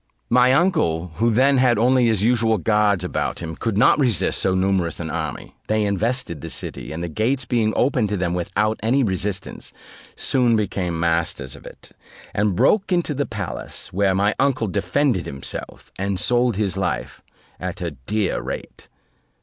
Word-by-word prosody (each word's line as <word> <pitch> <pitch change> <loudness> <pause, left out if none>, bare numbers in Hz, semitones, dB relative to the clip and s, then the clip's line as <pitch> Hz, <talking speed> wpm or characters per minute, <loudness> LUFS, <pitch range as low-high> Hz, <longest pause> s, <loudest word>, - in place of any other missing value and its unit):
My 125 +1 +5
uncle, 90 - +1
who 115 +1 +2
then 130 +4 +3
had 125 -3 +4
only 125 +2 +3
his 110 -3 +1
usual 115 -1 +2
guards 105 -1 +2
about 90 - -2
him, 80 -1 -5
could 110 +1 -2
not 110 - +5
resist 110 - +2
so 95 - +1
numerous 95 -2 0
an 80 -2 -4
enemy; 80 -6 -5
they 110 0 +1
invested 105 - -1
the 85 - -6
city, - - -4
and 80 +2 -5
the - - -2
gates 120 - -1
being 115 -4 +1
opened 125 -5 +1
to 105 - -1
them 90 -1 -1
without 105 +5 -1
any 130 +5 +2
resistance, 95 -1 -3 0.4
soon 125 -3 +2
became 95 -5 -1
masters 80 -5 -1
of - - -12
it, - - -14 0.4
and 105 -2 +1
broke 190 - +2
into 175 -4 +1
the 140 0 -2
palace 100 -6 -6
where 95 0 +2
my 100 +2 +2
uncle 135 -4 +2
defended 100 - 0
himself, 70 -1 -6
and 100 -1 -1
sold 120 +2 +2
his 100 -3 -1
life 95 - -3 0.4
at 90 0 -5
a 85 -2 -3
dear 95 - -2
rate. - - -7
105 Hz, 170 wpm, -22 LUFS, 90-120 Hz, 0.4 s, My